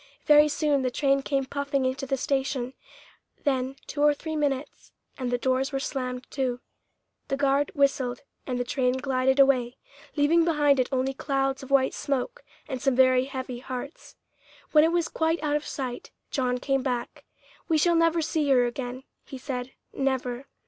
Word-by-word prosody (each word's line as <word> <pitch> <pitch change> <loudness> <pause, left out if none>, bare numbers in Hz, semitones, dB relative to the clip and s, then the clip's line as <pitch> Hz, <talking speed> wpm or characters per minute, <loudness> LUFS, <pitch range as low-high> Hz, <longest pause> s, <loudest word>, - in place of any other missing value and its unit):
Very 300 0 +7
soon 295 -1 +1
the 255 - 0
train 275 +2 +1
came 270 -1 -1
puffing 280 0 -1
into 260 +1 -2
the 270 - 0
station; 265 -1 -1 0.7
then 265 -2 0
two 290 - -4
or 295 0 +5
three 315 +2 -5
minutes, 285 -2 -2 0.2
and 255 -2 -3
the 245 - +1
doors 260 +2 0
were 270 - -1
slammed 255 -2 -4
to; 255 -3 -1 0.7
the 275 - -1
guard 280 +1 +2
whistled 275 -3 +1 0.2
and 250 -2 -2
the - - +1
train 250 0 0
glided 260 0 +1
away, 255 -3 +3 0.4
leaving 310 +3 +4
behind 295 -4 +3
it 250 - +1
only 265 0 0
clouds 270 0 -1
of 270 - -10
white 275 -1 +3
smoke 280 - -3 0.2
and 260 -3 -4
some 270 -2 +2
very 255 0 +5
heavy 260 -2 -5
hearts. 260 +3 -7 0.6
When 305 -1 +6
it 325 - +3
was 340 -1 +1
quite 320 +1 0
out 295 -1 +1
of 300 - -2
sight, 255 -3 -5 0.2
John 250 -2 0
came 270 +1 0
back. 250 -2 -3 0.4
"We 320 - +3
shall 340 +3 +3
never 330 0 +3
see 305 -2 0
her 250 -2 +5
again," 245 +1 -5 0.2
he 265 - -8
said 255 -1 -5 0.2
"never." 265 -1 -2
270 Hz, 175 wpm, -26 LUFS, 255-290 Hz, 0.7 s, Very